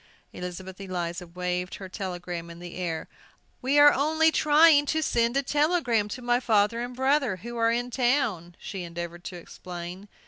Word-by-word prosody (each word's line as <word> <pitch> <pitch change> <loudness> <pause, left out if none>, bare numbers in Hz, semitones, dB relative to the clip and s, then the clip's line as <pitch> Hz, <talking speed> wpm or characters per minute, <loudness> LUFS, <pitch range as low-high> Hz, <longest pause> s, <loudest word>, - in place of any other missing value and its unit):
Elizabeth 185 +1 -7
Eliza 180 -2 -4
waved 180 +1 -3
her 190 - -8
telegram 175 -3 -5
in 170 - -10
the 175 0 -9
air. 170 -3 -3 0.5
"We 270 +3 +1
are 290 0 +8
only 315 +3 +3
trying 300 -1 +5
to 315 +1 +1
send 235 -1 +1
a 275 - +1
telegram 290 -7 +1
to 245 +4 -7
my 240 0 +2
father 220 -1 +2
and 245 +1 -5
brother, 265 -4 +2
who 235 +6 -8
are 230 0 +3
in 245 +1 -1
town," 240 - 0
she 195 -3 -6
endeavored 170 0 -6
to 180 - -6
explain. 175 +2 -8
210 Hz, 170 wpm, -27 LUFS, 180-265 Hz, 0.5 s, are